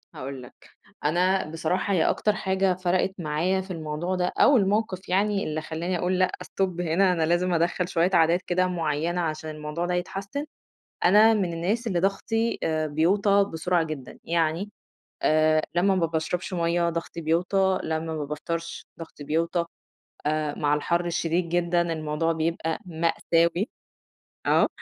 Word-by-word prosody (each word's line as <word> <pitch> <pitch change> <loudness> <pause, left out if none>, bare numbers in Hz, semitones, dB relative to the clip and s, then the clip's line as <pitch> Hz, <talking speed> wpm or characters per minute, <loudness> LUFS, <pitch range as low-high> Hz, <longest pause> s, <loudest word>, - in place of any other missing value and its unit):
هأقول 135 0 -6
لك، 125 - -16 0.4
أنا 180 +2 +2
بصراحة 165 +5 -1
هي 165 - +3
أكتر 210 - +1
حاجة 190 -2 +1
فرقِت 185 +1 0
معايا 170 +4 0
في 190 +1 -9
الموضوع 165 +2 -3
ده 180 -1 0
أو 285 - +6
الموقِف 200 -2 0
يعني 200 +2 +1
اللي 155 0 -2
خلّاني 165 +3 -3
أقول 180 +2 0
لأ 185 0 +2
stop 185 -3 -2
هنا 180 +3 +2
أنا 165 -3 +1
لازم 175 +2 +1
أدخّل 175 +1 +1
شوية 175 +1 +2
عادات 170 +2 +4
كده 185 0 +1
معيّنة 170 -1 -1
عشان 155 -1 -3
الموضوع 155 +3 -4
ده 180 - -1
يتحسّن، 195 +10 -3 0.6
أنا 210 +5 +7
من 185 -6 0
الناس 205 +8 -1
اللي 185 -5 0
ضغْطي 225 +5 0
آآ 155 -1 0
بيوطى 195 +6 +3
بسرعة 170 +1 +1
جدًا، 155 -5 -7
يعني 165 +4 0 0.5
آآ، 155 0 +3
لمّا 190 +3 +3
ما 175 -3 +2
باشرَبش 165 +3 -3
مَيّة 170 0 +1
ضغْطي 170 0 -5
بيوطى، 180 +4 +1
لمّا 160 0 -1 0.2
ما 155 -2 -3
بافطَرش 165 +3 -5
ضغْطي 160 -3 -9
بيوطى 165 +3 0 0.6
آآ، 150 -1 0
مع 145 0 +2
الحر 170 +4 0
الشديد 170 0 -1
جدًا 175 0 +2
الموضوع 155 +1 -1
بيبقى 165 0 -1
مأساوي، 170 +3 +1 0.8
آه، - - +4
170 Hz, 150 wpm, -26 LUFS, 160-185 Hz, 0.8 s, أنا